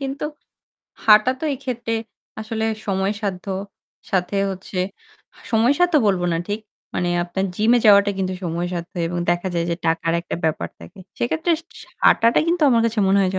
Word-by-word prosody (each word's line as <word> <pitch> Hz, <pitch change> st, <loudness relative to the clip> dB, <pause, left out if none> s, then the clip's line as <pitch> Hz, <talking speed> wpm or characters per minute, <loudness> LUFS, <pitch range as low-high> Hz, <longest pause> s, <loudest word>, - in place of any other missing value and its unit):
কিন্তু 275 Hz, +1 st, -4 dB, 0.8 s
হাঁটা 215 Hz, +3 st, +7 dB
তো -, -, -3 dB
এক্ষেত্রে 245 Hz, -3 st, -4 dB, 0.5 s
আসলে 220 Hz, 0 st, -3 dB, 0.2 s
সময় 195 Hz, 0 st, 0 dB
সাধ্য। 195 Hz, -2 st, -3 dB, 0.6 s
সাথে 190 Hz, 0 st, 0 dB
হচ্ছে 190 Hz, 0 st, -6 dB, 0.7 s
সময় 230 Hz, +5 st, +4 dB
সাধ্য 355 Hz, -2 st, +3 dB
বলব 190 Hz, -3 st, +2 dB
না -, -, +1 dB
ঠিক। 205 Hz, +2 st, -2 dB, 0.3 s
মানে 175 Hz, -, 0 dB, 0.2 s
আপনার 190 Hz, +2 st, -2 dB
জিমে 230 Hz, +3 st, +4 dB
যাওয়াটা 200 Hz, -1 st, +7 dB
কিন্তু 190 Hz, -1 st, -1 dB
সময় 170 Hz, +1 st, -2 dB
সাধ্য 170 Hz, 0 st, -5 dB, 0.2 s
এবং 175 Hz, -, -3 dB
দেখা 175 Hz, +2 st, 0 dB
যায় 170 Hz, -1 st, 0 dB
যে 170 Hz, -, +1 dB
টাকার 165 Hz, 0 st, +1 dB
একটা 170 Hz, -, -5 dB
ব্যাপার 150 Hz, -, 0 dB
থাকে। 85 Hz, 0 st, -13 dB, 0.2 s
সেক্ষেত্রে 320 Hz, +8 st, 0 dB, 0.3 s
সি -, -, -11 dB, 0.2 s
হাঁটাটা 230 Hz, +1 st, +5 dB
কিন্তু 340 Hz, 0 st, +1 dB
আমার 230 Hz, -, +4 dB
কাছে 230 Hz, 0 st, -2 dB
মনে 195 Hz, +1 st, +4 dB
হয় 185 Hz, -, +2 dB
যে, -, -, 0 dB
200 Hz, 170 wpm, -21 LUFS, 180-230 Hz, 0.8 s, হাঁটা